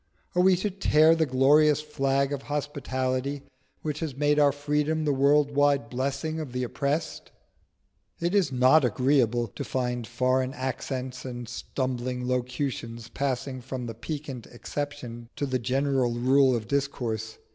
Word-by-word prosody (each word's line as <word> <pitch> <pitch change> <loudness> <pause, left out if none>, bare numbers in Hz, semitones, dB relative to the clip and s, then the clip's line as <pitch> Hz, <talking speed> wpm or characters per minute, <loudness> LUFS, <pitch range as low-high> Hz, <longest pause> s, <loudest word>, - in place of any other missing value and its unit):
Are 180 - +3
we 185 0 +5
to 195 +3 -2
tear 160 -4 +4
the 160 -1 +1
glorious 145 +3 +4
flag 140 -2 0
of 140 - -3
hospitality 140 -1 -2 0.4
which 150 -1 -3
has 150 -6 -4
made 150 +1 +3
our 145 -1 +5
freedom 150 +2 0
the 145 - +2
world 145 +2 +3
wide 140 -5 +2
blessing 140 +5 -2
of 145 -6 -6
the 125 0 -1
oppressed? 140 +5 -2 0.9
It 170 +2 -1
is 195 -8 +3
not 130 +4 +5
agreeable 125 -1 +2
to - - -6
find 125 -2 -2
foreign 130 +2 0
accents 130 0 -4
and 120 -2 -6
stumbling 125 0 -3
locutions 125 -2 -3
passing 130 0 -2
from 130 0 -5
the 115 - -5
piquant 135 0 -6
exception 120 -3 -6
to 145 - -1
the 130 -2 -1
general 130 0 +1
rule 130 +2 +4
of 110 -3 -4
discourse. 120 -5 -2
135 Hz, 145 wpm, -27 LUFS, 125-145 Hz, 0.9 s, we